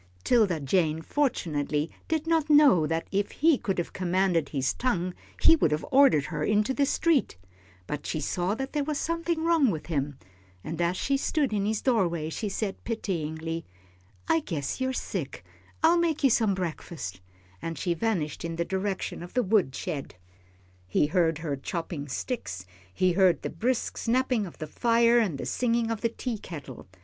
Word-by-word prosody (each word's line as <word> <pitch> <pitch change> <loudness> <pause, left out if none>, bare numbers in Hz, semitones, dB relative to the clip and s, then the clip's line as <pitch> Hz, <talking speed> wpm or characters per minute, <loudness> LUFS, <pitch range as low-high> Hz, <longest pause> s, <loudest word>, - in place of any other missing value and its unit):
'Tilda 205 -9 +3
Jane 155 +2 +1
fortunately 155 - -1 0.2
did 320 -1 -1
not 325 -2 +1
know 285 - +6
that 165 +1 -2
if 200 +1 0
he 320 +1 +4
could 195 - -2
have 175 - -3
commanded 180 -4 +1
his 135 -3 0
tongue 185 -8 -1 0.3
he 325 - +7
would 295 - +2
have 150 +1 -1
ordered 265 - +5
her - - -3
into 210 +4 +2
the 280 +1 +1
street, 310 - +1 0.5
but 150 +7 -5
she 155 - -2
saw 180 +6 -1
that 270 +3 -5
there 295 -1 +1
was 300 0 -2
something 335 0 -1
wrong 330 -6 +4
with 160 -6 -3
him, 145 -4 -2 0.5
and 165 +1 -4
as 175 +2 +1
she 275 0 +1
stood 280 -3 0
in 205 -1 0
his 215 -1 -1
doorway, 170 - +1
she 210 +5 -3
said, 195 0 -3
pityingly, 165 -7 -3 0.6
"I 325 - +4
guess 165 - -4
you're 260 0 +1
sick; 260 - -4 0.4
I'll 335 +2 +6
make 325 -3 0
you 270 - +5
some 215 -4 +3
breakfast," 160 - -5 0.4
and 165 -1 -4
she 175 +4 0
vanished 170 -6 -2
in 165 0 -3
the 170 +1 -1
direction 190 0 -3
of 175 +5 -10
the 250 - +3
wood 190 -10 +2
shed. 150 - -5 0.7
He 95 - +2
heard 165 0 +2
her 155 -3 -3
chopping 165 +1 -5
sticks, 125 - -4 0.3
he 185 - +2
heard 180 -3 +3
the - - -3
brisk 235 +9 -1
snapping 245 -3 +1
of 170 - -12
the 155 - -5
fire 235 +7 +3
and 195 -11 0
the - - -5
singing 235 -2 0
of 225 - -3
the 230 - +1
teakettle. 175 - -6
190 Hz, 180 wpm, -27 LUFS, 160-250 Hz, 0.7 s, he